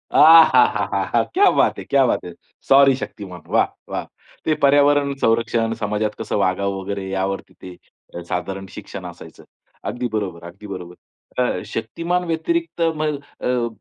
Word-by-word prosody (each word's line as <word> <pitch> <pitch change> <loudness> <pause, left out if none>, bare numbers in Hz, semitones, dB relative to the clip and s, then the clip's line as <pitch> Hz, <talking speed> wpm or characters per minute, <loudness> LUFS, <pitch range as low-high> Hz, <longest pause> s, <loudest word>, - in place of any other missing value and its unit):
आहाहाहा! 160 +1 +5
क्या 400 +2 +5
बात - - +2
है! - - -6
क्या 140 -1 +3
बात - - 0
है! 90 - -8 0.3
सॉरी 135 0 +6
शक्तिमान. 95 -8 -8
वाह, - - +3 0.2
वाह! - - -4 0.4
ते 155 - +2
पर्यावरण 145 0 +4
संरक्षण, 115 0 +1
समाजात 105 0 -1
कसं - - -3
वागावं 100 0 0
वगैरे 100 0 -5
यावरती 95 0 -3
ते 90 -1 -13
साधारण 95 +2 -4
शिक्षण - - -9
असायचं. - - -11 0.4
अगदी 125 0 -3
बरोबर, 95 -6 -3
अगदी 100 +5 -12
बरोबर. 90 -3 -8 0.5
अ, 125 - -1
शक्तिमान 170 +11 -2
व्यतिरिक्त 330 - -2
मग 150 -2 -2 0.2
अ, 125 -2 0
115 Hz, 140 wpm, -21 LUFS, 95-145 Hz, 0.5 s, सॉरी